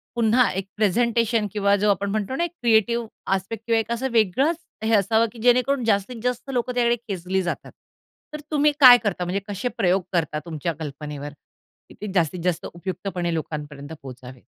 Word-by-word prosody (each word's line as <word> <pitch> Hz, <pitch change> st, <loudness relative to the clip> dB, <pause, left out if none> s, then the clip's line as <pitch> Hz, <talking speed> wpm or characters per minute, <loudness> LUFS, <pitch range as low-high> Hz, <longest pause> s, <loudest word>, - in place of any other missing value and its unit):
पुन्हा 235 Hz, +1 st, +3 dB
एक 190 Hz, +1 st, -4 dB
प्रेझेंटेशन 230 Hz, +1 st, +2 dB
किंवा 200 Hz, -1 st, +3 dB
जो 205 Hz, +1 st, +1 dB
आपण 200 Hz, 0 st, -1 dB
म्हणतो 215 Hz, +4 st, -2 dB
ना, 340 Hz, -, 0 dB
एक 345 Hz, -, -2 dB
क्रिएटिव्ह 235 Hz, 0 st, +2 dB, 0.3 s
आस्पेक्ट 200 Hz, +4 st, -5 dB
किंवा 230 Hz, -1 st, +3 dB
एक 225 Hz, +1 st, -4 dB
असं 260 Hz, +3 st, -1 dB
वेगळंच 235 Hz, -, +2 dB, 0.3 s
हे 225 Hz, +1 st, +1 dB
असावं, 220 Hz, +3 st, +3 dB
की 235 Hz, -, -13 dB
जेणेकरून 250 Hz, +2 st, +3 dB
जास्तीत 220 Hz, +2 st, 0 dB
जास्त 250 Hz, +2 st, -2 dB
लोकं 250 Hz, 0 st, -1 dB
त्याकडे 240 Hz, -1 st, +3 dB
खेचली 190 Hz, 0 st, -1 dB
जातात. 175 Hz, -, -4 dB, 0.6 s
तर 300 Hz, -, -5 dB
तुम्ही 295 Hz, 0 st, +3 dB
काय 250 Hz, -3 st, +10 dB
करता, 190 Hz, -4 st, -1 dB
म्हणजे 180 Hz, +3 st, -1 dB
कसे 205 Hz, +5 st, -3 dB
प्रयोग 185 Hz, +1 st, +2 dB
करता 160 Hz, -3 st, 0 dB
तुमच्या 165 Hz, 0 st, -3 dB
कल्पनेवर, 145 Hz, -1 st, -6 dB, 0.6 s
की -, -, -13 dB
ते 210 Hz, -2 st, -4 dB
जास्तीत 175 Hz, -2 st, +1 dB
जास्त 180 Hz, -2 st, -1 dB
उपयुक्तपणे 180 Hz, -1 st, -4 dB
लोकांपर्यंत 150 Hz, -2 st, -5 dB
पोहचावेत? 130 Hz, -1 st, -11 dB
205 Hz, 175 wpm, -23 LUFS, 175-235 Hz, 0.6 s, काय